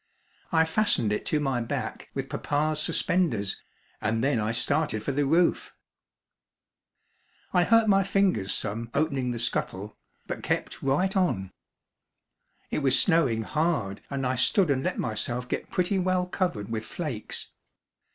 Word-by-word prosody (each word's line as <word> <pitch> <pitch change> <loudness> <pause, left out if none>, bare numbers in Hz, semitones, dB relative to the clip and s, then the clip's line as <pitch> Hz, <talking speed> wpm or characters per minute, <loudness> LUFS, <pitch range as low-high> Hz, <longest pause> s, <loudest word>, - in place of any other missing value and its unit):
I 160 -2 +4
fastened 160 - +2
it 105 - -3
to 155 - +1
my 135 -4 0
back 115 - -4
with - - -3
papa's 155 +1 -1
suspenders, 150 - 0 0.4
and 115 +2 0
then 135 -3 +2
I 105 +1 0
started 140 -1 0
for 140 - -1
the 140 +1 +1
roof. 170 +4 +2 1.8
I 180 -1 +4
hurt 230 -1 +5
my 195 -1 +5
fingers 190 - +1
some 115 +3 -1
opening 140 -4 +1
the 120 - -2
scuttle, 105 -2 -2 0.3
but - - -5
kept - - -2
right 165 +9 +1
on. 100 - +1 1.2
It - - 0
was 135 -3 +3
snowing 135 -11 +3
hard 150 - -1
and 135 -1 -2
I 125 - +1
stood 160 - +3
and 135 -1 0
let - - -1
myself 120 +2 -2
get - - -3
pretty 185 +2 +1
well 185 0 +1
covered 175 - -2
with 110 -1 -2
flakes. 135 -10 -5
140 Hz, 145 wpm, -27 LUFS, 115-175 Hz, 1.8 s, hurt